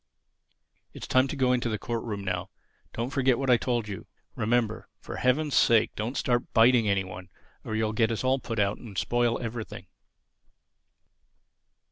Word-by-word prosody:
It's - - -7
time 130 +1 +3
to 140 - -4
go 130 -2 +2
into 125 -1 0
the 110 - -1
court 115 +3 -4
room 105 -4 -4
now. 90 -2 -3 0.4
Don't 120 +3 -3
forget 130 -3 +2
what 135 -2 +1
I 120 - +6
told 120 -2 -1
you. 100 -3 -7 0.3
Remember: 110 0 0
for - - -8
Heaven's 140 +3 +1
sake 115 -2 +4
don't 115 +5 -3
start 120 -2 0
biting 115 -1 +5
any 100 -1 +2
one 95 +1 -9 0.3
or 110 - -4
you'll 110 0 0
get 110 0 +2
us 115 - -2
all 130 +1 +2
put 115 -3 -5
out 100 0 +1
and 105 -6 -10
spoil 120 +4 +1
everything." 115 -1 -6
115 Hz, 170 wpm, -27 LUFS, 105-125 Hz, 0.4 s, I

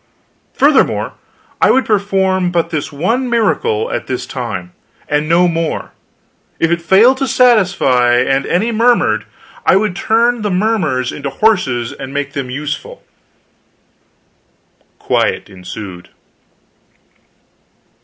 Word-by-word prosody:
Furthermore, - - +2 0.5
I - - +5
would 265 - +3
perform 190 -3 +1
but 170 -2 -1
this 155 -1 -3
one 230 - -1
miracle 215 - 0
at - - -4
this - - -3
time, 90 -1 -6 0.3
and 150 +1 -1
no 175 +2 +4
more; 165 -1 -2 0.7
if 165 - +1
it 170 0 0
failed 215 +10 +4
to 270 0 -1
satisfy 185 - +3
and 135 +2 +1
any 215 +7 0
murmured, 235 +2 +2 0.4
I - - +4
would 195 -2 +1
turn 230 +4 +1
the 210 - -1
murmurers 180 - 0
into 140 -1 -5
horses, 135 - 0
and 135 -1 -8
make 145 0 -3
them 135 -2 -4
useful. 150 +4 -6 1.9
Quiet - - -1
ensued. 90 -1 -9
170 Hz, 115 wpm, -15 LUFS, 135-215 Hz, 1.9 s, I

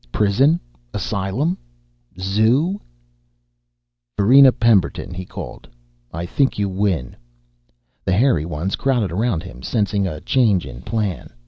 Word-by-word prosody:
Prison? 130 - +3 0.4
Asylum? 100 - -1 0.6
Zoo?... 115 - +1 1.4
"Varina 130 +6 +7
Pemberton," 100 -6 +1
he 90 +1 -6
called, - - -9 0.4
"I 85 +1 -4
think 135 +9 0
you 100 -1 0
win." 95 -9 -1 0.9
The 95 - 0
hairy 105 - +3
ones 85 +3 -2
crowded 125 -9 0
around 100 -2 -1
him, 60 0 -11
sensing 100 - 0
a 75 -4 -5
change 105 - +2
in - - -9
plan. 100 - -3
100 Hz, 115 wpm, -20 LUFS, 90-125 Hz, 1.4 s, Varina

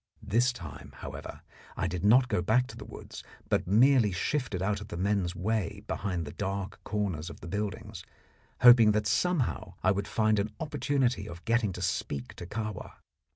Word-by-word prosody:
This 120 +4 +2
time, 85 - -10
however, - - -8 0.4
I - - 0
did 90 0 -3
not 125 +5 +6
go 90 - 0
back 115 +7 +3
to - - -9
the - - -9
woods, - - -10 0.3
but - - +1
merely 115 +2 +5
shifted 110 +2 -1
out 100 +2 -1
of 105 - -8
the 85 - -6
men's 95 -2 0
way 100 +1 -2
behind 90 -6 -2
the 75 - -7
dark 95 +2 -4
corners 95 -6 -2
of - - -10
the - - -9
buildings, 100 0 -4 0.6
hoping 120 -3 +8
that 105 0 +1
somehow 150 - 0
I 95 - +4
would 100 0 -1
find 110 -1 +2
an 105 +1 -2
opportunity 135 -7 0
of 85 -1 -10
getting 115 -3 +2
to - - -5
speak 70 -3 -2
to 90 - -7
Kahwa. 105 0 -5
105 Hz, 180 wpm, -29 LUFS, 95-115 Hz, 0.6 s, hoping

